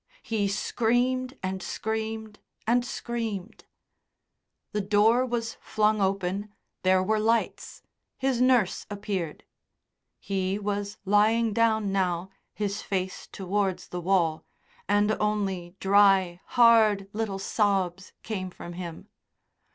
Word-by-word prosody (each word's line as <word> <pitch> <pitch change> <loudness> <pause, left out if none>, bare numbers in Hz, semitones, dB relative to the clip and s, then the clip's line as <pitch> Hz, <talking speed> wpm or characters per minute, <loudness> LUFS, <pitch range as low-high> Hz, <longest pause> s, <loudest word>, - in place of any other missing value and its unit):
He 215 -3 0
screamed 245 +5 0
and 190 0 -2
screamed 220 +1 -4 0.3
and 240 +2 +3
screamed. 230 -5 -5 1.1
The 210 - -1
door 210 +5 +4
was 230 -2 -3
flung 215 -1 +1
open, 195 +1 -1 0.3
there 185 0 +3
were 215 +3 +1
lights, 225 +2 -1 0.3
his 260 -2 0
nurse 250 -7 +3
appeared. 195 -6 -4 0.8
He 190 0 -1
was 205 0 -3
lying 215 +3 +3
down 220 -2 +2
now, 185 -1 0 0.2
his 205 0 -2
face 190 -1 -3
towards 190 -1 -2
the 180 - -4
wall, 170 -3 +1 0.5
and 205 +1 +3
only 195 -4 -1
dry, 195 -3 +4
hard 220 -5 +5
little 210 -2 -2
sobs 195 -2 0
came 190 -4 -4
from 175 -1 -9
him. 170 -2 -7
205 Hz, 110 wpm, -27 LUFS, 190-220 Hz, 1.1 s, hard